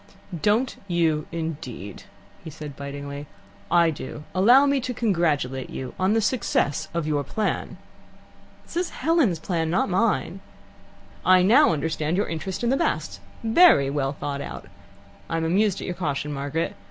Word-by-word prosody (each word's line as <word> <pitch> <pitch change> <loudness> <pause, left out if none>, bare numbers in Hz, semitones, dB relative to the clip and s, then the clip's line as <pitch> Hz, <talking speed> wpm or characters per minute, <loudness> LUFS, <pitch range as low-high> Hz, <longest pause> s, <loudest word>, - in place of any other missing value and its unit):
"Don't 225 - +1
you 165 -4 +1
indeed?" 145 - -6 0.4
he 165 - -7
said 150 -2 -8
bitingly. 140 +1 -7 0.4
"I 170 -1 +4
do. 150 0 -7
Allow 240 +9 +6
me 280 -1 +2
to 250 0 -4
congratulate 155 - 0
you 130 - -6
on 190 +3 +2
the 225 - +2
success 205 - 0
of 170 -2 -2
your 150 -2 0
plan." 190 0 -2 0.9
"This - - -8
is 355 0 0 0.2
Helen's 310 - +3
plan, 160 0 -2
not 180 +4 +1
mine." 195 0 0 0.8
"I 185 -1 +5
now 240 - +6
understand 160 +1 -1
your 205 - +1
interest 180 +6 -4
in 240 - +2
the 270 - +2
Basts. - - -1 0.2
Very 225 - +5
well 140 -1 -1
thought 140 -1 -4
out. - - -7 0.6
I 165 - -1
am 165 - -1
amused 195 +3 +2
at - - -5
your 180 - -3
caution, 150 -4 -3
Margaret. 145 +4 -2
170 Hz, 155 wpm, -24 LUFS, 145-210 Hz, 0.9 s, Allow